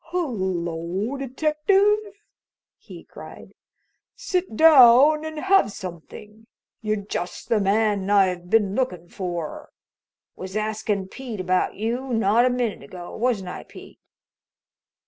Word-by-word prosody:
"Hello, 190 - -3
detective!" 305 - +1 0.8
he - - -12
cried. - - -13 0.6
"Sit 370 - -3
down 295 +1 +7
and 315 0 -6
have 385 - +3
something! 200 +4 -10 0.3
You're 215 -2 -2
just 175 -3 -5
the 225 - +2
man 200 -1 +1
I've 185 -3 +2
been 210 -3 +2
lookin' 180 -9 -3
for. 175 -4 -6 0.7
Was 190 +1 -8
askin' 215 -2 -2
Pete 240 -1 -8
about 185 0 0
you 240 +4 -3
not 225 +3 +3
a - - +2
minute 245 -4 -2
ago 175 +5 -10
wasn't 220 -6 -1
I, - - -7
Pete?" - - -14
215 Hz, 115 wpm, -23 LUFS, 190-265 Hz, 0.8 s, down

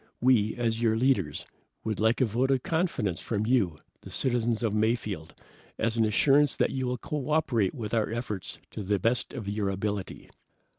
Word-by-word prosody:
We, 115 -4 +3
as 115 -2 -1
your 110 -2 +3
leaders, 110 - +1 0.4
would 110 -2 -2
like 110 +4 +2
a - - +5
vote 120 +4 0
of 135 -2 +2
confidence 160 - 0
from 110 -2 -2
you, 105 -10 +2 0.2
the - - -11
citizens 120 -2 0
of 110 -3 +1
Mayfield, 105 -6 -1 0.4
as 115 0 0
an 115 -1 +3
assurance 140 +7 +4
that - - +2
you 130 -1 -2
will 125 0 -1
co 145 +3 -4
operate 120 -11 +1
with 110 -2 -5
our 110 -2 +1
efforts 110 -4 -4
to - - -5
the 100 +1 +1
best 115 +4 0
of 115 -7 -6
your 100 -1 -1
ability." 100 0 -4
115 Hz, 185 wpm, -28 LUFS, 105-125 Hz, 0.4 s, a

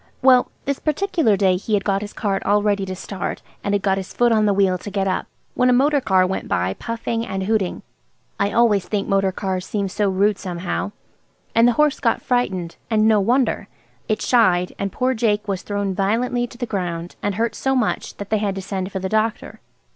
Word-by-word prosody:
Well, 255 -1 +5 0.2
this 280 -1 -1
particular 310 - +1
day 190 -2 +3
he 210 +3 -1
had 200 - 0
got 195 -1 0
his 210 0 -6
cart 200 -3 -1
all 205 0 +2
ready 200 -2 +1
to 185 - -4
start 190 0 -5 0.2
and 200 0 +1
had 200 - -1
got 195 -1 +2
his 190 - -8
foot 240 -1 +3
on 215 -1 +3
the - - +4
wheel 190 -2 +2
to 205 - -7
get 195 -1 -1
up, 185 - -1 0.3
when 250 0 +3
a - - +5
motor 280 +3 +3
car 190 -6 +3
went 190 +1 -3
by 90 +2 0
puffing 230 - -3
and 195 -4 -3
hooting. 205 -2 -1 0.6
I 200 +1 +1
always 215 -5 +3
think 205 -2 -1
motor 195 -1 +2
cars 185 -1 -3
seem 200 +1 -2
so 205 +1 0
rude 200 +2 +2
somehow. 180 +2 -3 0.6
And 230 +1 +5
the 245 - +4
horse 300 +2 +2
was 230 - +2
frightened; 190 -9 -1
and 215 -1 +3
no 215 -1 +5
wonder. 245 +6 +1 0.4
It 215 - -1
shied, 185 -7 +3
and 200 -1 -2
poor 255 +5 0
Jake 215 -3 0
was 195 -3 -2
thrown 205 -1 -2
violently 240 +5 0
to 240 - -14
the 245 - -2
ground, 175 -5 -4
and 205 -1 -1
hurt 230 +2 0
so 265 0 0
much 245 -5 -1
that 200 0 -8
they 215 - +2
had 200 -2 -1
to 195 - -4
send 190 0 -4
for 190 - -3
the 190 0 -2
doctor. 215 +2 -1
205 Hz, 220 wpm, -21 LUFS, 190-230 Hz, 0.6 s, Well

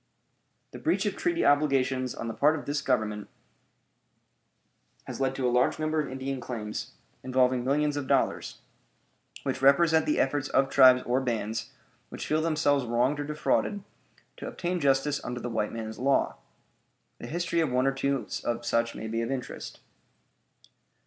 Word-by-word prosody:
The - - -9
breach - - 0
of - - -1
treaty 345 -1 0
obligations 135 -3 +2
on 115 - -5
the 115 - -3
part 150 +6 +3
of - - -8
this 145 0 -1
Government 110 -5 -1 1.7
has - - -7
led 135 0 0
to 130 -2 0
a - - +1
large 125 +1 +2
number 155 0 0
of 150 - -5
Indian 130 0 -4
claims, 110 -3 -5 0.3
involving 130 -1 +2
millions 145 +3 +1
of 145 -2 -3
dollars, - - 0 0.8
which - - -2
represent 160 +3 +4
the 150 - +1
efforts 135 +1 0
of 135 0 +2
tribes 130 -2 +7
or 125 +2 +1
bands 115 -3 -2 0.4
which - - -6
feel 155 +1 +1
themselves 155 -4 +2
wronged 125 +5 +1
or 145 - -2
defrauded 155 +6 0 0.5
to - - -7
obtain 180 0 -3
justice 140 0 +1
under 125 0 -4
the 120 0 -5
white 110 -2 -1
man's 110 -1 -6
law. 135 +2 +1 0.8
The - - -7
history 170 +1 -1
of 160 -3 +2
one 125 +1 +2
or 135 - +3
two 135 -1 -1
such 115 0 -1
may 110 - -6
be 115 +1 -2
of 115 - -3
interest. 130 -2 -6
135 Hz, 160 wpm, -28 LUFS, 125-145 Hz, 1.7 s, tribes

